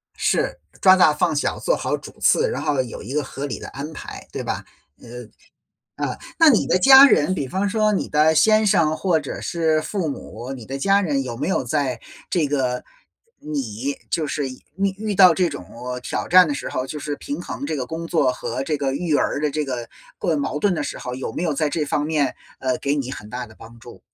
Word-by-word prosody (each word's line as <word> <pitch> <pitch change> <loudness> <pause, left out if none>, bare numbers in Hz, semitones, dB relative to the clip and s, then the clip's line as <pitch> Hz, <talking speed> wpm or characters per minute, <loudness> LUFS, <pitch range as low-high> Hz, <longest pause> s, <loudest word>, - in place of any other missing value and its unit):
是， - - 0 0.2
抓 185 -1 +8
大 170 -5 +5
放 150 0 0
小， 145 - -1
做 - - +1
好 - - -2
主 - - -12
次， 475 +1 +3
然 - - -3
后 145 -4 +1
有 120 - -8
一 120 +6 -7
个 150 0 0
合 135 +1 -6
理 135 - -5
的 - - -8
安 145 +3 -7
排， - - -9
对 - - -4
吧？ - - -3 1.3
呃， - - -2
啊， - - -6 0.2
那 325 -2 +7
你 230 - +3
的 - - +3
家 270 +6 +9
人， 185 - +3
比 140 -7 -3
方 195 +7 -1
说 215 +1 +2
你 200 - -1
的 155 +1 +3
先 215 +5 +4
生 160 -6 +3
或 180 -4 +1
者 145 -3 -6
是 160 -2 +1
父 185 -5 -2
母， 130 -2 -7
你 125 -4 -9
的 135 +4 -5
家 195 +7 +3
人 145 -7 0
有 120 -2 -5
没 145 - -2
有 - - 0
在 135 -6 -1 0.3
这 165 -5 +1
个， 130 -3 -1 0.6
你， 135 -2 -3
就 160 -2 0
是 145 -3 -2
遇 130 - -10 0.4
遇 215 0 -3
到 185 -3 +7
这 180 -2 +2
种 90 - -8 0.4
挑 - - -3
战 180 0 +7
的 145 - -2
时 145 - -5
候， 130 +1 -3
就 150 - -6
是 145 0 -4
平 285 - -5
衡 280 - -5
这 - - -2
个 130 -3 -2
工 165 +1 -5
作 150 -6 +2
和 125 +1 -4
这 150 +2 -1
个 140 -2 -1
育 160 -1 0
儿 - - 0
的 150 -1 0
这 150 +1 -1
个 125 -4 -4 0.3
过 160 -3 0
矛 145 +1 -2
盾 200 +3 +2
的 155 - -2
时 - - -5
候， 125 - -5
有 130 -3 -5
没 - - -4
有 165 -3 0
在 150 +1 0
这 150 +1 -1
方 145 +1 -1
面， 150 -5 0 0.2
呃， 130 -1 0
给 140 +1 0
你 135 -3 -3
很 105 -6 -8
大 125 +2 -5
的 110 - -17
帮 115 +1 -13
助？ 120 -6 -13
150 Hz, 250 characters per minute, -22 LUFS, 135-180 Hz, 1.3 s, 家